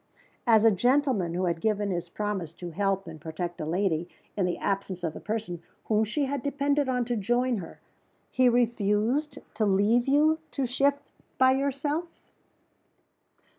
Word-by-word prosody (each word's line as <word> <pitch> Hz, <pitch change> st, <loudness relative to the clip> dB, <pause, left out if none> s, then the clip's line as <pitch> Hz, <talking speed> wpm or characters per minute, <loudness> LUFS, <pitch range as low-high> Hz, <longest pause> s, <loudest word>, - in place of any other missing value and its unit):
"As 225 Hz, -1 st, +5 dB
a 225 Hz, -, +7 dB
gentleman 245 Hz, -, +1 dB
who 185 Hz, +1 st, 0 dB
had 170 Hz, -2 st, -1 dB
given 210 Hz, -2 st, 0 dB
his 175 Hz, -1 st, -3 dB
promise 195 Hz, -5 st, -3 dB
to 175 Hz, 0 st, -8 dB
help 195 Hz, +2 st, 0 dB
and 160 Hz, -3 st, -10 dB
protect 170 Hz, +2 st, -5 dB
a 155 Hz, -, -3 dB
lady, 175 Hz, -1 st, 0 dB, 0.3 s
in 190 Hz, -3 st, +1 dB
the 175 Hz, -, -2 dB
absence 195 Hz, -2 st, -2 dB
of 160 Hz, -2 st, -1 dB
the -, -, -8 dB
person 210 Hz, -6 st, -4 dB, 0.2 s
whom 220 Hz, 0 st, +2 dB
she 280 Hz, +7 st, -1 dB
had 275 Hz, 0 st, -2 dB
depended 285 Hz, 0 st, 0 dB
on 250 Hz, -1 st, 0 dB
to 240 Hz, 0 st, -1 dB
join 240 Hz, +3 st, +1 dB
her, 170 Hz, -, -10 dB, 0.5 s
he 255 Hz, -1 st, +4 dB
refused 235 Hz, +4 st, +1 dB, 0.2 s
to 215 Hz, -, -1 dB
leave 205 Hz, +6 st, +3 dB
you 305 Hz, +3 st, +4 dB
to 275 Hz, -, -1 dB
shift 280 Hz, +3 st, 0 dB, 0.3 s
by 260 Hz, 0 st, +5 dB
yourself?" 280 Hz, +4 st, -1 dB
215 Hz, 165 wpm, -27 LUFS, 185-260 Hz, 0.5 s, a